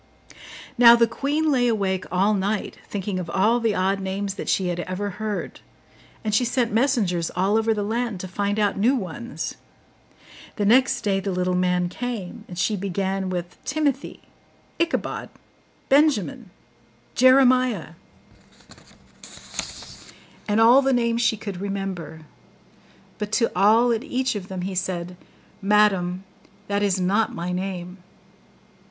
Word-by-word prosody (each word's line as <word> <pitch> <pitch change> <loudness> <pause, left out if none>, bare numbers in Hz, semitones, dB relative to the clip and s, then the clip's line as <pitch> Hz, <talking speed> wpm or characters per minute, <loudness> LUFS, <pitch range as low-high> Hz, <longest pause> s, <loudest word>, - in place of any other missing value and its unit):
Now 235 -1 +9
the 235 0 +4
queen 290 +6 -1
lay 250 -3 +3
awake 195 -5 0
all 195 +4 +2
night, 205 +1 -2
thinking 195 -1 -3
of 175 -2 -5
all 215 +7 +2
the 225 -3 0
odd 195 +2 +1
names 195 +1 -3
that 200 - -6
she 185 -2 +1
had 175 0 -3
ever 185 +3 -3
heard; 215 -2 -4 0.6
and 215 -2 -2
she 235 - +3
sent 240 -2 0
messengers 215 -9 +1
all 190 +4 +1
over 225 0 +2
the 210 -2 0
land 225 -1 -2
to 185 - -6
find 200 +2 -2
out 205 -2 +1
new 245 +7 +3
ones. 235 +3 -5 1.0
The 205 - -1
next 255 +5 +4
day 195 -2 +1
the 195 - -4
little 180 0 0
man 180 0 +1
came, 225 +1 -6
and 175 - -9
she 195 +3 +1
began 195 0 -2
with 175 -1 -5
TIMOTHY, 285 -2 -2 0.6
ICHABOD, 335 0 -1 0.6
BENJAMIN, 270 - +2 0.6
JEREMIAH, 255 - +4 2.5
and 210 +1 +1
all 240 +4 +7
the 270 0 +1
names 235 -1 +1
she 225 -2 +2
could 200 -4 -6
remember; 195 -6 -5 1.0
but 210 0 -4
to 230 0 +2
all 220 +6 +4
and 230 +1 -1
each 260 -3 -1
of 200 -3 -6
them 190 -2 -5
he 190 +1 -3
said, 180 -1 -3 0.5
'Madam, 195 -3 +2 0.4
that 200 0 0
is 200 -2 +1
not 200 +5 +1
my 175 +1 -3
name. 180 0 -4
205 Hz, 140 wpm, -23 LUFS, 185-235 Hz, 2.5 s, Now